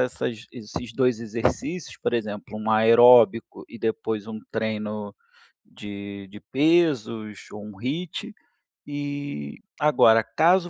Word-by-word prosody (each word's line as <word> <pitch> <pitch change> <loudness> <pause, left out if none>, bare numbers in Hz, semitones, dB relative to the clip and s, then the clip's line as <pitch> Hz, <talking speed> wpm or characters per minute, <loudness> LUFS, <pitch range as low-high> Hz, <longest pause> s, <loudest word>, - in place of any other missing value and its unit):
essas 120 -2 -3
esses 115 0 -8
2 125 -1 +1
exercícios. 115 - -3
Por - - -1
exemplo, 105 -2 -4
um 110 +1 -3
aeróbico 115 +1 +6
e 115 - -11
depois 110 -2 -2
um 110 -1 -6
treino 105 -2 -3 0.5
de 100 -1 -9
de 105 +1 -12
pesos 130 - +1
ou 105 0 -8
um 105 -2 -11
HIIT 170 - -4 0.6
e 145 - -5 0.2
agora, 115 -7 +5
caso 175 - +2
115 Hz, 120 wpm, -24 LUFS, 105-140 Hz, 0.6 s, aeróbico